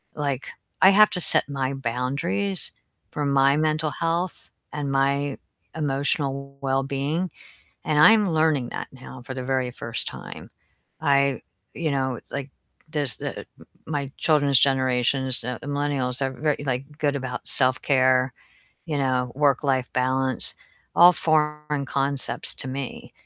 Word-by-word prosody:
like, 140 -3 -4 0.3
I 190 - +7
have 210 +2 +5
to 180 - -2
set - - +3
my 135 -2 -3
boundaries 120 -6 -2 0.4
for 150 - -4
my 140 0 +2
mental 155 0 -1
health 170 +3 -4 0.2
and 145 -2 -4
my 140 +1 -1 0.4
emotional 140 -2 -2
wellbeing, 140 +6 -2 0.5
and 155 - -2
I'm 210 +4 +5
learning 155 -6 0
that - - -7
now 130 -1 -13
for 130 - -8
the 130 - -6
very 130 -1 -2
first 115 -2 -4
time. - - -10 0.5
I 140 -3 +1 0.3
you 165 -2 -3
know, 130 -3 -2
like, 140 -1 -6 0.4
there's 145 -5 -3
the - - -6
m - - -10 0.4
my 140 -3 -5
children's 145 -4 +2
generations, 130 -1 +1
the 125 +1 -5
millennials, 140 -3 -3
are 135 -1 -1
very, 145 +2 -3
like, 135 +3 -5
good 145 -1 -1
about 130 -2 -3
self-care, 130 0 +8 0.6
you 155 -3 -3
know, 130 -2 -1
work-life 135 -2 0
balance, 130 0 +1 0.4
all 175 +1 +7
foreign 150 -3 -1
concepts 140 0 +2
to 130 - -4
me 135 0 -7
140 Hz, 135 wpm, -23 LUFS, 130-150 Hz, 0.6 s, self-care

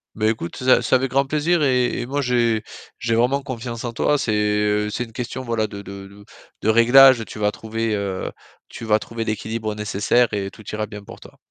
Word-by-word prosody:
Beh, 110 0 +1
écoute, 110 -6 -4
ça, 130 0 +4
c'est - - +2
avec 130 0 0
grand 135 +1 +2
plaisir 155 +3 +1
et 125 -2 +1
et - - -4
moi, 140 +2 -1
j'ai 120 -4 +1 0.3
j'ai 115 -1 -1
vraiment 130 +4 +2
confiance 120 -2 -6
en 120 -1 -4
toi. 145 +5 +1
C'est, 110 -5 -1
heu, 105 0 +1
c'est 120 +3 -3
une 115 - -11
question, 125 +2 -5
voilà, 115 -3 -1
de 100 -1 -8
de 100 0 -9
de 100 +1 -16 0.4
de 110 - +2
réglages. 120 +2 +7
Tu - - -10
vas 105 0 +1
trouver, 110 +1 -3
heu, 100 -2 -3 0.4
tu - - -10
vas 105 -1 +3
trouver 115 0 -5
l'équilibre 110 0 -3
nécessaire 105 +3 +1
et 100 -1 -2
tout 110 - -15
ira 105 0 -2
bien 105 -1 -9
pour - - -12
toi. - - -16
115 Hz, 220 wpm, -21 LUFS, 105-125 Hz, 0.4 s, réglages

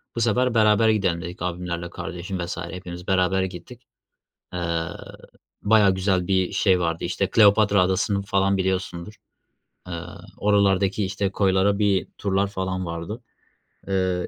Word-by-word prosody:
Bu 115 - -2
sefer, 125 +2 +2
"Beraber 110 0 +4
gidelim." 95 -6 +1
dedik 90 0 -8
abimler 90 0 -3
ile 85 - -7
kardeşim 90 +2 -6
vs. 85 0 -4
hepimiz 90 0 -7
beraber 95 0 +2
gittik. 95 +7 -8 0.7
Iıı, 85 -2 -2 0.7
bayağı 100 -3 +4
güzel 95 -1 0
bir 95 -2 +1
şey 95 -2 +2
vardı, 85 -1 -2
işte, - - -1
Kleopatra 100 -2 +5
Adası'nı 95 +2 +1
falan 100 0 +1
biliyorsundur, 95 0 -2 0.7
ııı, 85 +1 -8
oralardaki, 100 -1 +2
işte, 100 +1 -2
koylara 100 +1 +2
bir 100 -2 +1
turlar 100 -1 0
falan 95 -2 -3
vardı. 85 +7 -6 0.7
Iıı, 95 -2 0
95 Hz, 135 wpm, -23 LUFS, 90-100 Hz, 0.7 s, Kleopatra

